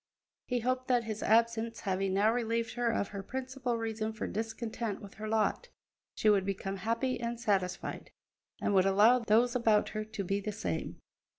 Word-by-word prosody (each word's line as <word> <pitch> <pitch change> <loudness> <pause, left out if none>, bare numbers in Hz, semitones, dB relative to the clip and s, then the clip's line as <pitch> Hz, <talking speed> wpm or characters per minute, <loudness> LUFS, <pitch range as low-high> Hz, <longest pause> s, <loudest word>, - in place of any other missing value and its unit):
He 250 -2 0
hoped 255 +2 -1
that, 245 -2 +3
his 220 -1 -5
absence 230 0 +2
having 190 0 0
now 210 +3 +4
relieved 230 -1 -1
her 240 -1 0
of 225 -3 0
her 200 -2 -5
principal 255 +2 -3
reason 220 -1 -3
for 220 - -4
discontent 225 -1 -3
with 200 - -11
her 215 - -3
lot, 225 - 0 0.5
she - - 0
would 205 -2 +5
become 195 0 -3
happy 230 +6 -1
and 235 0 -3
satisfied, 190 -4 -1 0.5
and - - 0
would 190 0 +5
allow 210 +6 +6
those 235 +2 +3
about 220 -4 +3
her 215 0 -3
to 215 -2 -5
be 195 +2 0
the 210 +1 -3
same. 90 - -4
220 Hz, 180 wpm, -31 LUFS, 200-235 Hz, 0.5 s, allow